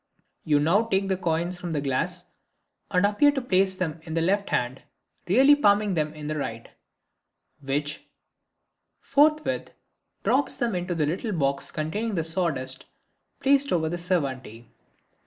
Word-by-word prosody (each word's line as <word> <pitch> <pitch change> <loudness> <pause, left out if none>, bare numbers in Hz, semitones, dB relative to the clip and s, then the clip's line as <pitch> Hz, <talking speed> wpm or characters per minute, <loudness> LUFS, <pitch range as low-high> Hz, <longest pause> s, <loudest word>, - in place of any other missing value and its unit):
You 150 -2 +3
now 175 +10 +3
take 195 -3 0
the 190 - +2
coins 175 0 -2
from 175 -2 -4
the 150 - 0
glass 135 -2 -2 0.6
and 180 +2 +2
appear 210 +8 +4
to 275 - -1
place 190 -6 +1
them 170 -4 -3
in 160 0 -7
the 165 - +1
left 200 +4 +1
hand, 125 +2 -1 0.5
really 265 +10 +6
palming 205 -6 +3
them 155 -3 0
in 150 -1 -8
the 155 0 -2
right, 115 -4 -5 0.9
which 145 +2 -3 0.9
forthwith 305 +2 +2 0.5
drops 275 +2 +1
them 240 -4 -1
into 180 0 -2
a 155 -2 +1
little 190 +8 -2
box 140 -4 -1
containing 180 +4 -2
sawdust 155 -6 -3 0.5
placed 280 0 +3
on 160 -2 +1
the 175 - -3
servante. 135 - -3
175 Hz, 145 wpm, -26 LUFS, 150-205 Hz, 0.9 s, really